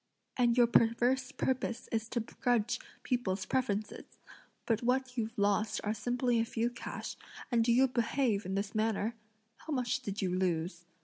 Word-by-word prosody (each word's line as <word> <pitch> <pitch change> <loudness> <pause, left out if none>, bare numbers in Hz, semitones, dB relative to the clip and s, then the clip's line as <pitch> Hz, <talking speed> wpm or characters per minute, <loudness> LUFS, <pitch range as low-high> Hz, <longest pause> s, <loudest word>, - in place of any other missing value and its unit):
and 240 -1 +3
your 240 - +7
perverse 245 +3 +3
purpose 250 -3 -1
is 225 0 -1
to 240 - -1
begrudge 235 0 0 0.2
people's 195 -7 -1
preferences! 215 -5 -2 0.5
But 225 -2 +1
what 250 +1 0
you've 225 -2 -3
lost 205 +1 +2
are 210 - 0
simply 245 +2 0
a - - +3
few 230 0 -1
cash, 240 - -6 0.4
and 235 -2 +4
do 235 - +3
you 260 +3 +5
behave 235 -3 +1
in 190 0 -3
this 200 0 -2
manner? 220 0 0 0.4
How 315 - -6
much 255 0 0
did 205 -6 -5
you 185 -3 0
lose?" 175 -1 -1
230 Hz, 165 wpm, -32 LUFS, 210-250 Hz, 0.5 s, your